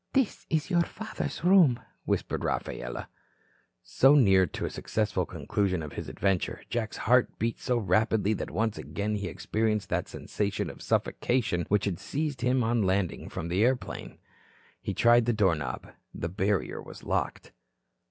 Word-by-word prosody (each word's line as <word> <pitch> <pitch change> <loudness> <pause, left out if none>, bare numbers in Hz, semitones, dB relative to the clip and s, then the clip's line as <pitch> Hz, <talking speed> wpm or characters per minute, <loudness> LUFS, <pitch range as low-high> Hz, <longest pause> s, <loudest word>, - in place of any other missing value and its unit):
"This 265 -5 0
is 160 +3 0
your 170 -1 +4
father's 220 +2 -5
room," 175 -9 +6 0.3
whispered - - -1
Rafaela. - - -3 0.8
So 135 +3 +5
near 95 -9 +5
to - - -4
a - - -2
successful - - -1
conclusion 95 -5 -1
of 75 - -7
his - - -5
adventure, 95 -3 -1
Jack's 115 -2 -2
heart 125 +2 +3
beat 115 +1 -1
so 125 - 0
rapidly 110 +1 +2
that - - -4
once 110 -1 -1
again 105 +1 -3
he 100 -3 -2
experienced 105 +5 -1
that - - -1
sensation 105 -1 -3
of - - -14
suffocation 115 -9 0
which 105 0 +2
had 95 -4 -2
seized 150 -2 -3
him 125 +1 +2
on 115 0 +2
landing 95 -2 0
from 85 - -5
the 90 +5 +2
airplane. 125 0 -1 0.6
He - - -3
tried 120 0 +5
the 120 - +2
door 100 -5 +3
knob. 75 -4 -5 0.2
The 85 - -3
barrier 95 +1 -1
was - - -11
locked. - - -2
110 Hz, 160 wpm, -28 LUFS, 95-125 Hz, 0.8 s, room